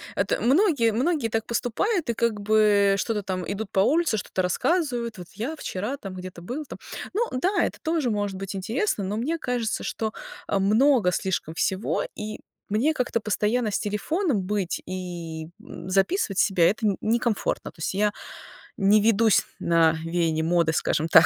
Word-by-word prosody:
Это, -, -, 0 dB
многие 280 Hz, -, +3 dB
многие 260 Hz, +2 st, 0 dB
так 225 Hz, 0 st, -1 dB
поступают, 265 Hz, -, -1 dB
и -, -, +2 dB
как 225 Hz, -2 st, 0 dB
бы 205 Hz, -1 st, +4 dB
что-то 210 Hz, +1 st, -1 dB
там 185 Hz, -1 st, -3 dB
идут 205 Hz, +1 st, -4 dB
по -, -, +1 dB
улице, 305 Hz, -, +2 dB
что-то 185 Hz, -1 st, -2 dB
рассказывают: 240 Hz, -, 0 dB
вот 180 Hz, -1 st, -9 dB
я 240 Hz, +10 st, -4 dB
вчера 220 Hz, +1 st, -4 dB
там 195 Hz, -8 st, -8 dB
где-то 180 Hz, -1 st, -8 dB
был 260 Hz, -, -5 dB
там. -, -, -9 dB, 0.4 s
Ну 460 Hz, +3 st, +1 dB
да, 365 Hz, +11 st, +1 dB
это -, -, -3 dB
тоже 315 Hz, -5 st, 0 dB
может 205 Hz, -3 st, -1 dB
быть 195 Hz, +1 st, -5 dB
интересно, 220 Hz, -, -1 dB
но 200 Hz, +3 st, -2 dB
мне 295 Hz, +9 st, -1 dB
кажется, 245 Hz, -6 st, -2 dB
что, 220 Hz, -1 st, -3 dB, 0.3 s
э, -, -, +1 dB
много 215 Hz, +1 st, +4 dB
слишком 180 Hz, -3 st, -2 dB
всего, 190 Hz, +4 st, 0 dB
и 215 Hz, 0 st, -6 dB, 0.3 s
мне 240 Hz, +10 st, +2 dB
как-то 250 Hz, -4 st, 0 dB
постоянно 215 Hz, +2 st, 0 dB
с -, -, -1 dB
телефоном 220 Hz, -, -1 dB
быть 195 Hz, -2 st, -2 dB
и, 170 Hz, -4 st, -6 dB
м, -, -, -9 dB
записывать 195 Hz, -, +1 dB
себя- 180 Hz, -4 st, +4 dB
это 220 Hz, +2 st, -2 dB
не 200 Hz, -, +2 dB
некомфортно. 230 Hz, -1 st, 0 dB
То -, -, -24 dB
есть 160 Hz, -, -2 dB
я 205 Hz, +1 st, +1 dB, 0.6 s
не 205 Hz, +2 st, +4 dB
ведусь 220 Hz, 0 st, +4 dB, 0.2 s
на 165 Hz, -1 st, +4 dB
веяние 165 Hz, -2 st, 0 dB
моды, 165 Hz, -1 st, +2 dB
скажем 160 Hz, 0 st, 0 dB
так, -, -, +8 dB
210 Hz, 170 wpm, -25 LUFS, 190-245 Hz, 0.6 s, так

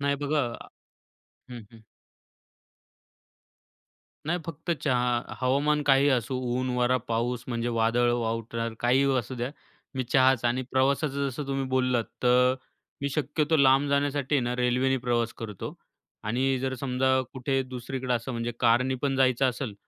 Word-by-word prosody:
नाही 140 Hz, 0 st, +1 dB
बघा 145 Hz, +1 st, +1 dB, 1.1 s
हं, 120 Hz, -1 st, -7 dB
हं. 115 Hz, -1 st, -16 dB, 2.4 s
नाही 175 Hz, +2 st, 0 dB
फक्त 165 Hz, +1 st, -6 dB
चहा. 125 Hz, -3 st, 0 dB
हवामान 145 Hz, +4 st, +2 dB
काहीही 140 Hz, 0 st, +4 dB
असू 130 Hz, 0 st, 0 dB, 0.2 s
ऊन, 130 Hz, 0 st, -1 dB
वारा, 125 Hz, +1 st, +3 dB
पाऊस 120 Hz, +1 st, -1 dB
म्हणजे 120 Hz, 0 st, -2 dB
वादळ, 115 Hz, +2 st, +2 dB
वावटळ 115 Hz, 0 st, -2 dB
काहीही 135 Hz, +3 st, +3 dB
असू 125 Hz, +2 st, -4 dB
द्या. 125 Hz, +1 st, -3 dB, 0.4 s
मी 130 Hz, -1 st, -1 dB
चहाचं 130 Hz, -1 st, +3 dB
आणि 130 Hz, +2 st, -1 dB
प्रवासाचं 140 Hz, +1 st, +1 dB
जसं 135 Hz, +3 st, -5 dB
तुम्ही 135 Hz, 0 st, -1 dB
बोललात 125 Hz, -3 st, +1 dB, 0.2 s
तर 125 Hz, +1 st, +4 dB, 0.5 s
मी 140 Hz, -, -1 dB
शक्यतो 150 Hz, +2 st, 0 dB
लांब 135 Hz, 0 st, +4 dB
जाण्यासाठी 140 Hz, 0 st, 0 dB
आहे 140 Hz, -, +4 dB
ना 120 Hz, +1 st, -1 dB
रेल्वेने 125 Hz, +2 st, +2 dB
प्रवास 120 Hz, -1 st, +1 dB
करतो 105 Hz, -4 st, -6 dB, 0.5 s
आणि 130 Hz, +5 st, +1 dB
जर 130 Hz, +1 st, -2 dB
समजा 130 Hz, 0 st, +1 dB
कुठे 135 Hz, 0 st, -1 dB
दुसरीकडे 130 Hz, 0 st, -4 dB
असं 120 Hz, +2 st, -3 dB
म्हणजे 115 Hz, 0 st, -3 dB
कारनी 125 Hz, +2 st, +3 dB
पण 140 Hz, -2 st, 0 dB
जायचं 130 Hz, 0 st, +3 dB
असेल. 120 Hz, -3 st, -5 dB
130 Hz, 140 wpm, -27 LUFS, 120-135 Hz, 2.4 s, काहीही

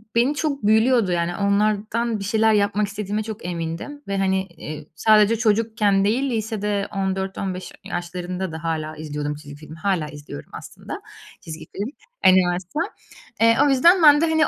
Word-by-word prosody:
beni 250 Hz, +5 st, +3 dB
çok 285 Hz, -5 st, -2 dB
büyülüyordu. 220 Hz, -1 st, +4 dB
Yani, 175 Hz, 0 st, 0 dB
onlardan 215 Hz, +3 st, 0 dB
bir -, -, -5 dB
şeyler 220 Hz, +2 st, +3 dB
yapmak 205 Hz, 0 st, +2 dB
istediğime 210 Hz, +1 st, -3 dB
çok 215 Hz, -5 st, -7 dB
emindim 170 Hz, -, -5 dB
ve, 200 Hz, 0 st, -2 dB
hani, 190 Hz, 0 st, +1 dB
iii, 155 Hz, -3 st, -9 dB
sadece 215 Hz, +2 st, +5 dB
çocukken 215 Hz, -3 st, +2 dB
değil, 255 Hz, +6 st, +1 dB
lisede 210 Hz, -2 st, -2 dB
14-15 190 Hz, -1 st, -3 dB
ya -, -, -8 dB
yaşlarında 180 Hz, +1 st, -4 dB
da 160 Hz, +1 st, -7 dB
hâlâ 155 Hz, -1 st, -2 dB
izliyordum 150 Hz, -1 st, -4 dB
çizgi 145 Hz, -1 st, -11 dB
filmi. 155 Hz, +2 st, -12 dB
Hâlâ 170 Hz, -2 st, 0 dB
izliyorum 145 Hz, -, -10 dB
aslında -, -, -8 dB, 0.4 s
çizgi 160 Hz, -1 st, -8 dB
film, 205 Hz, +4 st, -2 dB, 0.4 s
animasyon. 185 Hz, -, +3 dB, 0.5 s
Eee, 230 Hz, 0 st, +5 dB
o -, -, +3 dB
yüzden 335 Hz, +7 st, +5 dB
ben 295 Hz, -1 st, +8 dB
de, -, -, +4 dB
hani, 315 Hz, -1 st, +3 dB
200 Hz, 160 wpm, -22 LUFS, 175-220 Hz, 0.5 s, ben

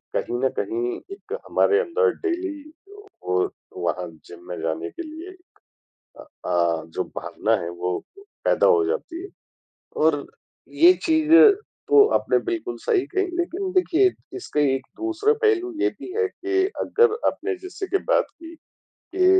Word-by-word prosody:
कहीं 120 Hz, -, -1 dB
न -, -, +4 dB
कहीं 120 Hz, +4 st, -2 dB, 0.2 s
एक 410 Hz, +1 st, -10 dB
हमारे 420 Hz, 0 st, +3 dB
अंदर 465 Hz, +1 st, +2 dB
डेली 350 Hz, -3 st, -1 dB, 0.7 s
वो 90 Hz, 0 st, 0 dB, 0.4 s
वहाँ 90 Hz, -, -2 dB, 0.2 s
जिम 85 Hz, -, -12 dB
में 90 Hz, -, -5 dB
जाने 80 Hz, +1 st, -2 dB
के -, -, -7 dB
लिए, 320 Hz, +3 st, -9 dB, 0.9 s
अ -, -, -11 dB, 0.2 s
अ, 85 Hz, -2 st, +1 dB
जो 80 Hz, -, -3 dB
भावना -, -, -1 dB
है 85 Hz, -, -4 dB
वो 90 Hz, +1 st, -2 dB, 0.5 s
पैदा -, -, +3 dB
हो 440 Hz, -4 st, +5 dB
जाती 385 Hz, -5 st, -3 dB
है, 395 Hz, -, -8 dB, 0.7 s
और 155 Hz, -2 st, +2 dB, 0.6 s
ये 180 Hz, +2 st, +10 dB
चीज़ें 320 Hz, +5 st, +7 dB, 0.4 s
तो 420 Hz, -1 st, +8 dB
आपने -, -, +2 dB
बिल्कुल 365 Hz, 0 st, -3 dB
सही 425 Hz, -7 st, +1 dB
कही, 390 Hz, -1 st, 0 dB
लेकिन 370 Hz, +2 st, -2 dB
देखिए 370 Hz, 0 st, +3 dB, 0.3 s
इसका 375 Hz, -, -3 dB
एक 135 Hz, -2 st, +1 dB
दूसरा 340 Hz, +6 st, +1 dB
पहलू 370 Hz, -4 st, +2 dB
ये 395 Hz, -, +3 dB
भी -, -, -8 dB
है 450 Hz, -2 st, +2 dB
कि 385 Hz, 0 st, 0 dB, 0.2 s
अगर 465 Hz, -1 st, +3 dB
आपने 405 Hz, -1 st, -1 dB
जैसे 375 Hz, +1 st, -6 dB
की 390 Hz, -, +1 dB
बात -, -, +4 dB, 0.2 s
की 330 Hz, 0 st, -10 dB, 0.6 s
के 370 Hz, -1 st, +4 dB
350 Hz, 150 wpm, -23 LUFS, -, 0.9 s, ये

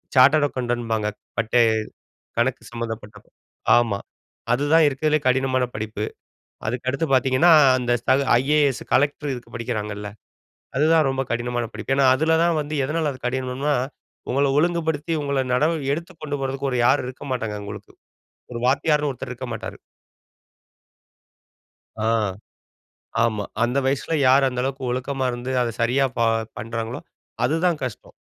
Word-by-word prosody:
Chartered 145 Hz, +3 st, +6 dB
அக்கவுண்டன்பாங்க 120 Hz, -4 st, -2 dB, 0.3 s
பட்டை 115 Hz, +2 st, +3 dB, 0.8 s
கணக்கு 125 Hz, +2 st, +1 dB
சம்மந்தப்பட்ட 115 Hz, -3 st, -6 dB, 0.6 s
ஆமா 115 Hz, -4 st, +2 dB, 0.5 s
அதுதான் 145 Hz, +5 st, +4 dB
இருக்கிறதிலேயே 150 Hz, +2 st, 0 dB
கடினமான 130 Hz, 0 st, +2 dB
படிப்பு. 110 Hz, 0 st, -4 dB, 0.6 s
அதுக்கடுத்து 130 Hz, +6 st, -1 dB
பார்த்தீங்கன்னா 130 Hz, +6 st, +4 dB, 0.3 s
அந்த 120 Hz, -1 st, +1 dB
தகு 140 Hz, +1 st, +4 dB, 0.2 s
ஐஏஎஸ் 145 Hz, -2 st, +2 dB
கலெக்டர் 140 Hz, -3 st, 0 dB
படிக்கிறாங்கல்ல 105 Hz, -3 st, -4 dB, 0.7 s
அதுதான் 155 Hz, 0 st, +4 dB
ரொம்ப 135 Hz, 0 st, 0 dB
கடினமான 120 Hz, 0 st, -1 dB
படிப்பு. 135 Hz, -, -2 dB
ஏன்னா, 135 Hz, -1 st, +4 dB
அதில 160 Hz, +4 st, +2 dB
தான் 170 Hz, -2 st, +2 dB
வந்து 150 Hz, +1 st, -4 dB
எதனால 155 Hz, +1 st, 0 dB
அது 130 Hz, -, -12 dB
கடினம்னா, 130 Hz, +3 st, -1 dB, 0.6 s
உங்கள 140 Hz, +2 st, +2 dB
ஒழுங்குபடுத்தி 160 Hz, -1 st, 0 dB
உங்கள 140 Hz, -2 st, 0 dB
நடவ 155 Hz, +5 st, +2 dB, 0.2 s
எடுத்துக் 170 Hz, +1 st, -9 dB
கொண்டு 145 Hz, -2 st, -3 dB
போறதுக்கு 135 Hz, 0 st, -2 dB
ஒரு 125 Hz, -, 0 dB
யாரும் 125 Hz, -, +3 dB
இருக்க 130 Hz, +2 st, -9 dB
மாட்டாங்க. 115 Hz, -4 st, -2 dB
உங்களுக்கு 100 Hz, 0 st, -9 dB, 0.6 s
ஒரு 120 Hz, -, -4 dB
வாத்தியார்ன்னு 150 Hz, +2 st, +2 dB
ஒருத்தர் 125 Hz, -, -7 dB
இருக்க -, -, -7 dB
மாட்டாரு. -, -, -6 dB, 2.3 s
ஆ -, -, +3 dB, 1.2 s
ஆமா. 105 Hz, -3 st, 0 dB, 0.2 s
அந்த 125 Hz, +3 st, +1 dB
வயசுல 140 Hz, +4 st, 0 dB
யார் 135 Hz, +1 st, +5 dB
அந்த 125 Hz, -1 st, -3 dB
அளவுக்கு 135 Hz, 0 st, -3 dB
ஒழுக்கமா 130 Hz, +1 st, -2 dB
இருந்து 120 Hz, +2 st, -4 dB
அத 120 Hz, -, -1 dB
சரியா 125 Hz, +4 st, +2 dB
ப -, -, 0 dB, 0.4 s
பண்றாங்களோ 115 Hz, +3 st, -4 dB, 0.4 s
அது 150 Hz, +6 st, +2 dB
தான் 170 Hz, -4 st, +1 dB
கஷ்டம். 120 Hz, -5 st, -8 dB
130 Hz, 130 wpm, -23 LUFS, 120-145 Hz, 2.3 s, Chartered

